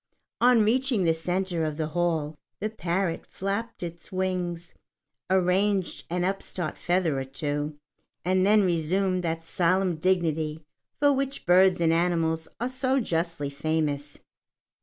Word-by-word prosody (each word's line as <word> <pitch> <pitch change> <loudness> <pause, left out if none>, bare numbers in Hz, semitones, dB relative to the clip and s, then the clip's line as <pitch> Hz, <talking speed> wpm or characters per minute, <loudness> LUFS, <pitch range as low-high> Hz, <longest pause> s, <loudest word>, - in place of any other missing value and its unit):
On 245 -2 +5
reaching 245 -1 +2
the 165 -1 +3
centre 175 +1 -1
of 155 -1 -2
the 155 -1 -2
hall, 160 -2 0 0.2
the 215 +2 -2
parrot 180 -4 -1
flapped 200 +3 -4
its 170 +3 -8
wings, 180 -2 -2 0.6
arranged 190 +1 +1
an 175 +1 -1
upstart 185 -3 -2
feather 175 -5 0
or - - -2
two, 145 +2 -3 0.5
and 185 +1 +3
then 210 +1 +5
resumed 185 +2 +1
that 165 -1 -2
solemn 180 0 +1
dignity 160 -3 0 0.3
for 285 -1 +4
which 275 0 -2
birds 185 +1 +5
and 165 -1 +3
animals 165 -1 +1
are 240 - 0
so 260 +1 +1
justly 165 - -2
famous. 145 -1 -2
175 Hz, 135 wpm, -27 LUFS, 160-195 Hz, 0.6 s, On